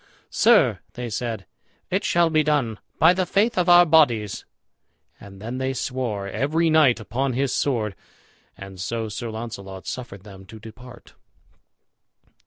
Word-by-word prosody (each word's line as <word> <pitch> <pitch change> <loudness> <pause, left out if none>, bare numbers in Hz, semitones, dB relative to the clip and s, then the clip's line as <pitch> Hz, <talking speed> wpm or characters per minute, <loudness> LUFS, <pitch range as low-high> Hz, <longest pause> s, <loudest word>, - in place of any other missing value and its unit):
"Sir," - - +4
they 120 -1 -6
said, 110 -3 -4 0.5
"it - - 0
shall 170 -1 +2
be 155 -1 +3
done, 145 -8 0 0.2
by 165 +3 +6
the 185 -1 -1
faith 210 +6 +1
of 180 -1 +1
our 175 0 +8
bodies;" 125 - +2 0.7
and 100 -1 -13
then 120 +5 -6
they 130 0 -1
swore, 120 -6 -3
every 150 - 0
knight 150 -7 +4
upon 130 +5 -2
his 135 +1 -1
sword. 110 -8 -1 0.6
And 95 -1 -10
so 115 +3 -3
Sir 115 +3 -5
Launcelot 105 -4 -8
suffered 110 -7 -7
them 95 -2 -13
to 110 +3 -12
depart. 115 +3 -14
120 Hz, 145 wpm, -23 LUFS, 105-150 Hz, 0.7 s, our